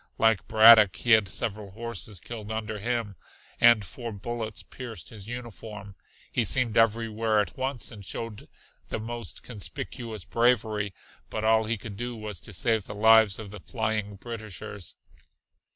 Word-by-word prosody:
Like 115 -3 +3
Braddock, 110 -4 +8
he 120 - -1
had 110 -3 +6
several 105 0 -3
horses 110 -2 -6
killed 110 +1 -7
under 110 -1 -3
him, 115 -2 -1 0.4
and 115 -4 +6
four 120 +6 -6
bullets 110 +1 -5
pierced 115 -10 -8
his 105 -3 -11
uniform. 110 -4 -8 0.4
He 120 - +1
seemed 115 +1 +2
everywhere 115 -1 +2
at 105 - -1
once 130 -2 -3
and 105 -3 -10
showed 110 +2 -6 0.4
the - - -3
most 115 -7 -6
conspicuous 115 -2 -6
bravery, 110 -4 +1 0.3
but 110 - -3
all 110 0 +4
he 115 +1 -1
could 100 0 -8
do 120 +1 -4
was 105 -5 -6
to - - -10
save 105 +3 0
the - - -7
lives 110 -1 +6
of 105 -3 -8
the 105 - -8
flying 110 -1 -2
Britishers. 105 -3 -7
110 Hz, 150 wpm, -27 LUFS, 105-115 Hz, 0.4 s, Braddock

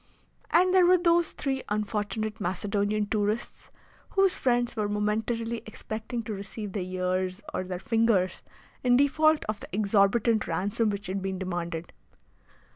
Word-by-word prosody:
And 365 +2 +4
there 365 -2 +6
were 365 +1 +6
those 340 -1 +3
three 270 -1 -2
unfortunate 215 +1 -2
Macedonian 205 +3 0
tourists, 210 +2 -2 0.4
whose 390 -1 +3
friends 245 -1 +1
were 210 -2 -1
momentarily 220 +3 -1
expecting 220 +2 -5
to 215 - -4
receive 200 +1 -6
their 200 - -3
ears 185 +1 -2
or - - -1
their 180 -1 -4
fingers 225 -2 +1 0.4
in 245 -1 +5
default 310 +3 +3
of 215 -1 -3
the - - -10
exorbitant 210 +2 +2
ransom 200 +6 0
which 200 -1 -4
had 190 +1 -2
been 190 0 -3
demanded. 175 -3 -4
210 Hz, 140 wpm, -28 LUFS, 195-235 Hz, 0.4 s, there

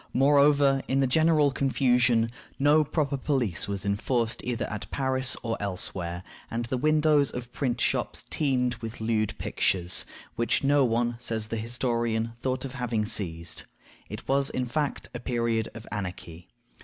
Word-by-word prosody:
Moreover, 140 0 +5
in 135 - +1
the 135 - +3
general 155 +1 +3
confusion, 125 -4 +2 0.3
no 145 +2 +5
proper 145 -2 -1
police 130 - -1
was 100 -1 -3
enforced 115 +3 0
either 120 -1 -2
at 105 -2 -6
Paris 130 -1 0
or 115 -1 -1
elsewhere, 90 -3 -2 0.3
and 115 +1 -2
the 125 +2 -2
windows 150 -1 +3
of 125 -1 -6
print 120 -4 -1
shops - - 0
teemed 125 -4 +1
with 115 -1 -7
lewd 110 -1 0
pictures, 90 -1 0 0.3
which 115 +3 +1
no 140 0 +4
one, 120 0 +1
says 115 -3 -1
the 115 - -2
historian, 115 -1 -1
thought 130 +1 -2
of 130 - -6
having 120 -5 -1
seized. 85 -6 -3 0.4
It - - -8
was, 135 0 +2
in 130 - -2
fact, 145 +3 -2
a 120 - -5
period 115 -2 -1
of 110 -1 -9
anarchy. 90 -4 -6
120 Hz, 155 wpm, -27 LUFS, 110-135 Hz, 0.4 s, Moreover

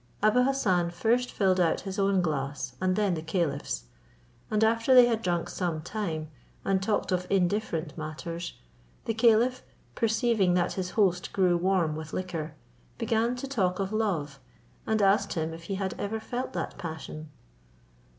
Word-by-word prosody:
Abou 215 +4 +5
Hassan 190 -11 +2
first 235 +8 +1
filled 190 -2 +2
out 165 -3 +2
his 195 +1 -5
own 195 -2 +3
glass, 140 -4 -2
and 185 0 +2
then 205 -3 +2
the 160 - -3
caliph's: 155 - -2 0.7
and 215 0 +2
after 230 +3 +4
they 250 -1 +10
had 230 -2 0
drunk 175 -4 0
some 175 -4 -2
time, 160 -4 -4 0.3
and 195 -1 +2
talked 205 0 0
of 180 0 0
indifferent 180 -5 0
matters, 165 +2 -5 0.5
the 225 - 0
caliph, 235 +3 +4 0.3
perceiving 220 -5 +2
that 175 -1 +1
his 185 -1 -3
host 180 -4 +2
grew 185 -3 +3
warm 175 -3 +1
with 155 0 -7
liquor, 165 -4 -4 0.4
began 230 +1 +1
to 250 +2 -5
talk 190 -9 0
of 195 +1 -2
love, 165 -11 -1 0.5
and 220 -1 +2
asked 195 +1 +3
him 160 -1 -2
if 165 +1 -10
he 195 - -3
had 190 -1 -2
ever 220 +2 -2
felt 245 +3 -4
that 170 - -4
passion. 155 -1 -6
185 Hz, 160 wpm, -28 LUFS, 165-220 Hz, 0.7 s, they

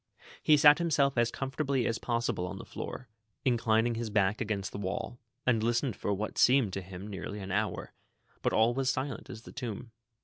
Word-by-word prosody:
He 150 - +5
sat 145 +2 +7
himself 145 -5 +2
as 120 -1 +3
comfortably 135 -1 -1
as 115 -1 0
possible 115 -6 -1
on - - -6
the - - -8
floor, 125 - -7 0.4
inclining 115 -2 +2
his 115 0 -3
back 105 -1 +1
against 105 -3 -2
the - - -6
wall, 100 +5 -4 0.3
and 115 -3 +3
listened 120 +1 +1
for 100 - -2
what 105 +2 -2
seemed 125 -6 +4
to 95 - -2
him 95 +2 -9
nearly 100 +1 -6
an 95 -1 -6
hour, 105 +2 -2 0.5
but - - +1
all 110 +2 +4
was 135 +1 -1
as 135 - +3
silent 130 -1 -4
as 115 -3 -8
the - - -11
tomb. 120 -2 -6
115 Hz, 200 wpm, -30 LUFS, 105-130 Hz, 0.5 s, sat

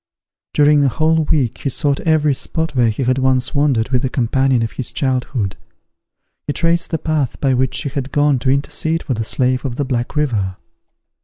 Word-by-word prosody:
During 145 0 +5
a - - +4
whole 155 +5 +1
week 135 -8 0
he 140 - -2
sought 140 +1 0
every 155 -3 +2
spot 160 +4 -3
where 120 -2 +3
he 110 +5 -2
had 130 +1 +1
once 130 0 +1
wandered 140 -6 +1
with 125 -2 +1
the 130 - -1
companion 130 0 +1
of 115 - -3
his 130 - -3
childhood. 125 -6 -2 0.9
He 145 - -1
traced 170 +1 +1
the 165 - -1
path 155 -5 -2
by 135 -2 +2
which 130 0 0
she 140 - -1
had 135 -1 -4
gone 145 -2 +2
to 130 - -1
intercede 145 +4 0
for 130 - -2
the 115 -1 -2
slave 125 +3 0
of 130 -4 -3
the 145 - -2
Black 125 0 -3
River. 105 -11 -1
135 Hz, 200 wpm, -18 LUFS, 125-150 Hz, 0.9 s, During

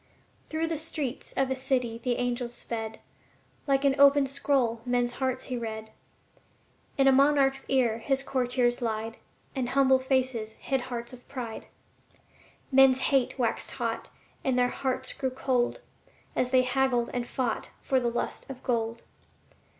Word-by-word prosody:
Through 320 +1 -1
the 325 -2 -2
streets 300 -5 -4
of 270 -1 0
a - - +1
city 250 -3 -1
the 250 -2 +1
angel 245 0 -1
sped; 225 -2 -5 0.7
Like 275 0 +2
an 275 - +5
open 280 0 +7
scroll 265 -4 +1
men's 245 0 +1
hearts 260 0 -2
he 255 - -3
read. 220 -1 -5 1.1
In 270 -1 +4
a - - +8
monarch's 270 0 +3
ear 240 -4 +2
his 270 +3 0
courtiers 245 -2 +1
lied 225 0 -2 0.4
And 255 -2 -1
humble 265 0 +4
faces 260 -4 0
hid 270 -2 -1
hearts 240 0 -5
of 250 0 -13
pride. 245 -5 -6 1.0
Men's 265 -1 +6
hate 260 -1 +1
waxed 235 -3 0
hot, - - -3 0.3
and 260 -2 +1
their 245 0 +3
hearts 260 0 -2
grew 265 - -2
cold, 255 - 0 0.5
As 250 - +1
they 255 0 +4
haggled 255 -2 +1
and 245 -1 -2
fought 245 -4 -2
for 265 - +1
the 240 -1 0
lust 240 +3 -3
of 260 -1 -8
gold. 230 -2 -1
255 Hz, 150 wpm, -28 LUFS, 240-270 Hz, 1.1 s, a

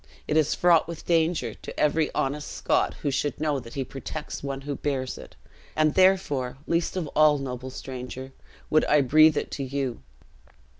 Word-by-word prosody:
It 150 - 0
is 155 -1 +3
fraught 170 -3 +4
with 170 -1 -8
danger 165 -8 +1
to - - -9
every 150 +1 +2
honest 145 +2 -2
Scot - - 0
who 145 - +1
should 145 +2 -1
know 150 -2 0
that 115 -2 -11
he 135 - -1
protects 135 +4 -6
one 135 -1 -4
who 145 +1 -4
bears 130 -3 -2
it; - - -12 0.4
and 155 -1 +3
therefore, 165 -10 +2
least 170 +2 0
of 180 - -1
all, 150 0 +4
noble 130 -1 -5
stranger, 130 0 -7 0.4
would 155 - +5
I 150 -1 +4
breathe 155 +4 +5
it - - -2
to 140 - -3
you." 135 - -3
145 Hz, 180 wpm, -26 LUFS, 135-155 Hz, 0.4 s, would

